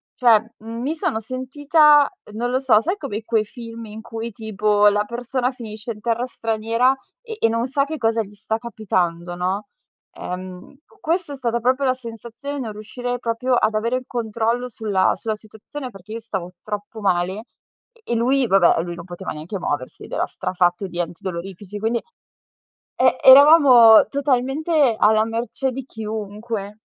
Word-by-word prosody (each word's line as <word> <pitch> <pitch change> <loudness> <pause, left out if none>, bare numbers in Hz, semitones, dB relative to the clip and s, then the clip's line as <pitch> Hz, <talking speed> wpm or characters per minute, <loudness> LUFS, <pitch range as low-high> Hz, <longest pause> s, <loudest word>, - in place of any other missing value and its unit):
cioè 235 -4 +5 0.2
m 230 +2 -7
mi 280 +5 -1
sono 220 -8 -1
sentita, 290 +5 +3 0.3
non 240 +3 -2
lo 255 - +1
so, 255 -6 +4
sai 350 - -1
come 230 - -5
quei 225 -1 +1
film 230 +1 -9
in 215 +1 -9
cui 225 0 -6
tipo 210 -1 +2
la 205 +1 0
persona 245 +2 -2
finisce 220 -2 -7
in 210 - -15
terra 235 +1 0
straniera 230 +2 +1 0.3
e 455 -3 -8
e 225 - +3
non 230 +2 0
sa 275 +1 +1
che 315 +2 -5
cosa 225 -3 +1
gli 205 0 -14
sta 215 +2 -3
capitando, 180 -7 -2
no, 185 +4 -2 0.5
ehm, 185 +7 -8 0.2
questa 335 -1 -1
è - - -5
stata 235 -2 -1
proprio 255 +3 +1
la 255 - +3
sensazione 235 +3 -8
di 280 - -4
non 225 -4 -5
riuscire 245 +4 -5
proprio 240 +2 -1
ad 220 - +2
avere 230 +3 0
il 255 - -6
controllo 235 +1 -1
sulla 205 -5 +1
sulla 220 -1 -3
situazione, 220 +6 -9
perché 195 +1 -11
io 230 - -4
stavo 190 -5 -5
troppo 210 +1 -6
male 190 +1 0 0.5
e 470 - -26
e - - +2
lui 255 +3 +2
va 195 - +5
beh, 175 - +5
e - - 0
lui 175 0 -6
non 170 0 -9
poteva 180 +1 -7
neanche 160 +6 -6
muoversi 145 -7 -4
ed - - -15
era - - 0
strafatto 180 +1 -1
di 175 -1 -7
antidolorifici. 180 +3 -6
Quindi, 225 +2 0 1.0
e - - +4
eravamo 265 -5 +8
totalmente 280 +1 +1
alla 215 +1 +4
mercé 235 +4 -2
di 265 +1 -6
chiunque. 215 -2 -6
225 Hz, 175 wpm, -21 LUFS, 205-255 Hz, 1.0 s, eravamo